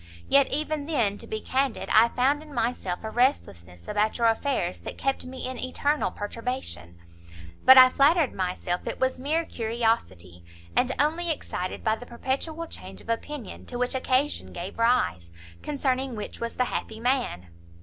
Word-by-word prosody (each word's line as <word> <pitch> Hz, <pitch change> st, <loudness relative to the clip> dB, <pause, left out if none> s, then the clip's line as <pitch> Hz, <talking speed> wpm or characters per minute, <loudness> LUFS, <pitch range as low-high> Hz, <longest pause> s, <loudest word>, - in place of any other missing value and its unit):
Yet 275 Hz, -1 st, +5 dB
even 300 Hz, 0 st, -2 dB
then, 225 Hz, -10 st, +1 dB
to -, -, -8 dB
be 215 Hz, 0 st, -4 dB
candid, 265 Hz, -2 st, -1 dB
I 220 Hz, +2 st, +7 dB
found 275 Hz, +5 st, +1 dB
in 310 Hz, -1 st, -13 dB
myself 225 Hz, -6 st, -2 dB
a 220 Hz, -, -4 dB
restlessness 90 Hz, -, -1 dB
about 210 Hz, +1 st, 0 dB
your 235 Hz, -, +1 dB
affairs 225 Hz, -5 st, +1 dB
that -, -, -8 dB
kept 270 Hz, -1 st, -1 dB
me 255 Hz, 0 st, -5 dB
in 255 Hz, -2 st, -5 dB
eternal 285 Hz, +3 st, 0 dB
perturbation; 205 Hz, -, -5 dB, 0.7 s
but 260 Hz, 0 st, +10 dB
I 255 Hz, 0 st, +10 dB
flattered 290 Hz, +2 st, +3 dB
myself 180 Hz, -1 st, -2 dB
it -, -, -4 dB
was 260 Hz, 0 st, 0 dB
mere 310 Hz, +5 st, 0 dB
curiosity, 220 Hz, -, -2 dB, 0.3 s
and 255 Hz, +1 st, +3 dB
only 325 Hz, +4 st, +1 dB
excited 185 Hz, -, -3 dB
by 220 Hz, 0 st, +1 dB
the 245 Hz, -, -11 dB
perpetual 275 Hz, +7 st, -3 dB
change -, -, -9 dB
of -, -, -14 dB
opinion 235 Hz, +1 st, -4 dB
to 245 Hz, -, -5 dB
which 250 Hz, +2 st, 0 dB
occasion 260 Hz, +2 st, 0 dB
gave 180 Hz, +5 st, -7 dB
rise, 90 Hz, -, +2 dB, 0.3 s
concerning 265 Hz, -3 st, -1 dB
which 210 Hz, -, -7 dB
was 235 Hz, 0 st, -4 dB
the 250 Hz, -, +1 dB
happy 220 Hz, -2 st, -4 dB
man." 240 Hz, -, -1 dB
250 Hz, 165 wpm, -26 LUFS, 215-275 Hz, 0.7 s, but